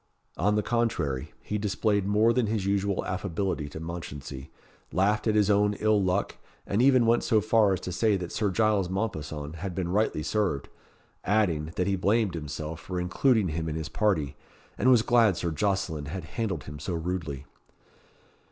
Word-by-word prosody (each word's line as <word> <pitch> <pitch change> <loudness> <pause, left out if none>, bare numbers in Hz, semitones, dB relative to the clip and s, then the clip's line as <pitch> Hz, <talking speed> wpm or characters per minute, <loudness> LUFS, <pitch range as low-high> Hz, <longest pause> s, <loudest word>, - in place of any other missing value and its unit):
On 105 0 +1
the 105 - +1
contrary, 90 - -1
he 105 - -2
displayed 100 -1 0
more 110 +3 +4
than 125 -3 +1
his 105 -2 -1
usual 100 0 0
affability 90 -4 -2
to 75 - -8
Mounchensey, 75 -5 -7 0.4
laughed 105 +4 +1
at 110 - +2
his 105 -2 +4
own 105 0 +3
ill 110 0 +2
luck, 95 +1 0 0.3
and 100 +4 +1
even 130 -2 +5
went 115 +1 +3
so 110 - +3
far 110 -1 +3
as 95 - -3
to 90 - -5
say 105 +3 +2
that 90 -2 -6
Sir 105 -2 0
Giles 105 -2 +2
Mompesson 80 -6 -4
had 90 +1 -5
been 90 -2 -2
rightly 100 -5 +1
served; 100 -10 -1 0.5
adding, 85 -7 +1
that 90 - 0
he 100 - +1
blamed 100 +1 +1
himself 75 0 -5
for 90 0 -4
including 100 +3 +2
him 80 +1 -3
in 75 - -3
his 80 -1 -4
party, 85 -10 0 0.4
and 130 - +2
was 120 -4 +6
glad 115 -7 +4
Sir 85 - -2
Jocelyn 80 -3 -1
had 90 +5 -5
handled 100 - -2
him 75 0 -9
so 90 - -3
rudely. 80 -5 -4
95 Hz, 180 wpm, -27 LUFS, 80-105 Hz, 0.5 s, was